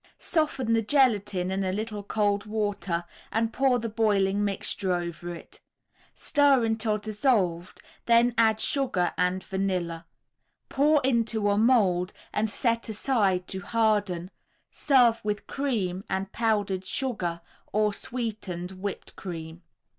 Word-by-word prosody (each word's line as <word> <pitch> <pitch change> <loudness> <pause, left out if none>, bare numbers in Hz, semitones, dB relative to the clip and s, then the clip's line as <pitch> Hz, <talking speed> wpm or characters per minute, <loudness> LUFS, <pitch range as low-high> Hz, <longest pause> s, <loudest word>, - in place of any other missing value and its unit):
Soften 275 -8 0
the 225 - +3
gelatine 210 -7 +2
in 195 +1 -1
a 185 - 0
little 210 +1 -4
cold 205 0 0
water 205 -5 -2 0.3
and 225 0 0
pour 265 -1 +3
the 230 -1 -3
boiling 205 -3 +1
mixture 195 -1 -2
over 175 0 -4
it. - - -11 0.6
Stir 285 -4 +3
until 220 -1 0
dissolved, 205 -5 0 0.3
then 235 +1 +5
add 220 -2 +3
sugar 250 -11 0
and 180 +1 0
vanilla. 180 -4 -2 0.6
Pour 295 +2 +3
into 230 -5 +1
a 200 - +1
mould 205 -6 +3 0.2
and 215 +1 0
set 230 +1 -1
aside 205 -5 +1
to 190 - -4
harden, 205 -4 0 0.4
serve 245 -5 +3
with 210 -1 -2
cream 200 -10 -2
and 190 0 -2
powdered 205 -5 0
sugar 190 -9 -2 0.3
or 210 0 +2
sweetened 205 -6 -4
whipped 190 +1 -6
cream. 165 -2 -7
210 Hz, 125 wpm, -27 LUFS, 185-230 Hz, 0.6 s, then